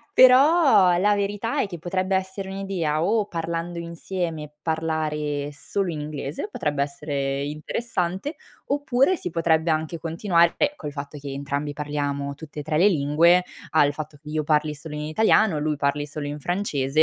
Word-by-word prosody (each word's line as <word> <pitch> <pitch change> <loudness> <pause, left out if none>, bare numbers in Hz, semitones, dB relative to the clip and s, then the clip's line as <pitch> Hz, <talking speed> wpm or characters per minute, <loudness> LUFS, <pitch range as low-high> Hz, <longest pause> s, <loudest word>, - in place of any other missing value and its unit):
però 255 - +6
la 205 +2 +3
verità 205 +3 -1
è - - +1
che 175 -4 -8
potrebbe 185 +3 -1
essere 190 +1 -2
un'idea 190 -6 -1
o 210 +3 +2
parlando 170 0 -3
insieme, 170 -2 -4
parlare 155 -3 -1
solo 190 +5 -2
in 155 - -4
inglese, 150 - -5
potrebbe 145 - -1
essere 140 -1 -3
interessante, 180 - -3 0.3
oppure 285 +4 +2
si 180 - -5
potrebbe 165 0 +2
anche 160 +1 -2
continuare 170 +1 +2
beh, 295 0 +1
col 150 - -6
fatto 140 +1 -7
che 140 -1 -7
entrambi 140 +1 -3
parliamo 145 -1 -3
tutte 150 -1 -8
e - - -4
3 155 0 -1
le 185 - +6
lingue, 170 +2 +4 0.3
al 145 -2 +4
fatto 150 0 -7
che 150 - -11
io 155 0 -1
parli 150 0 +2
solo 150 +1 -9
in 150 - -4
italiano, 165 +3 +3
lui 150 0 0
parli 145 +1 0
solo 145 0 -5
in 145 +1 -5
francese 155 -4 +1
160 Hz, 165 wpm, -24 LUFS, 150-190 Hz, 0.3 s, però